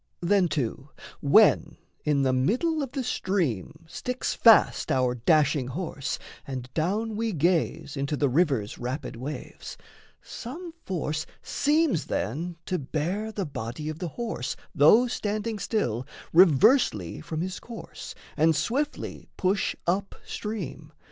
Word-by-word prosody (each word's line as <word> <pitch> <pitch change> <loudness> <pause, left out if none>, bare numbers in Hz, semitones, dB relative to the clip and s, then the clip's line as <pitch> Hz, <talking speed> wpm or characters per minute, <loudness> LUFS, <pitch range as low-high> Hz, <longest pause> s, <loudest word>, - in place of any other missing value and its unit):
Then 185 +1 +3
too, 140 -2 -3 0.3
when 210 +10 +5 0.3
in 145 -2 +2
the 130 -1 +2
middle 255 - +1
of 270 -3 -4
the 270 -2 -2
stream 165 - -1
Sticks 250 +9 -3
fast 225 -2 +5
our 130 -1 +2
dashing 140 +1 +2
horse, 145 -1 -3 0.3
and 130 -2 -6
down 210 +7 0
we 225 0 -1
gaze 165 -2 0
Into 140 +1 -1
the 145 - +2
river's 135 - +1
rapid 125 +3 -4
waves, 135 +6 -7 0.4
some 325 +8 -8
force 155 -4 -2 0.2
Seems 295 - +1
then 165 - -2
to 180 - -1
bear 170 +10 -2
the 200 -3 -3
body 140 +2 -5
of 155 0 -6
the 180 - -3
horse, 225 - -4 0.2
Though 210 - +6
standing 215 -2 -2
still, 130 - -1 0.3
reversely 165 - +5
from 160 0 -4
his 185 +1 -3
course, 235 -1 -9 0.2
And 160 +1 +4
swiftly 265 - -2
push 195 +1 +1
up 190 +3 0
stream. 155 -8 -5
165 Hz, 130 wpm, -27 LUFS, 140-215 Hz, 0.4 s, Though